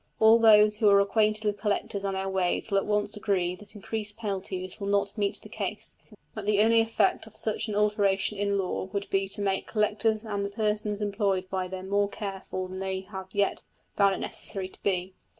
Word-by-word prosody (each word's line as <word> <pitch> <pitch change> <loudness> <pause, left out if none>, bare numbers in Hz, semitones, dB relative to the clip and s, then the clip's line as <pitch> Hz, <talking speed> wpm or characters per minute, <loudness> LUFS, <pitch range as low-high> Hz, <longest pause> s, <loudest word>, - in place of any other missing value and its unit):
All 220 +1 +7
those 210 -1 +6
who 215 -2 +4
are 200 0 +6
acquainted 215 +1 +2
with 205 -1 -1
collectors 200 -1 -1
and 195 -1 -1
their 190 0 -2
ways 190 +2 -1
will 195 - +4
at - - -5
once 210 0 0
agree 195 -4 0
that 210 +2 -14
increased 210 +1 -4
penalties 190 -3 -4
will 200 - -4
not 200 0 +1
meet 205 -3 0
the - - -10
case; - - -3 0.4
that 215 -2 -6
the 210 -1 +3
only 230 +1 +5
effect 225 0 +1
of 220 - -15
such 215 0 -1
an 210 - -3
alteration 205 -1 +1
in 200 0 +1
the 195 - +1
law 185 - -3
would 200 0 -2
be 195 0 +1
to 200 +1 -2
make 195 -1 0
collectors 215 0 +1
and 205 -2 -2
the 200 - -2
persons 210 0 -1
employed 200 -2 0
by 185 -1 -1
them 185 0 -7
more 200 +1 +1
careful 190 -2 -5
than 185 0 -7
they 190 0 -2
have 190 -1 -8
yet 200 0 0 0.3
found 200 -1 +4
it - - -6
necessary 190 -2 -4
to - - -15
be. 185 -1 -1
200 Hz, 215 wpm, -28 LUFS, 195-210 Hz, 0.4 s, All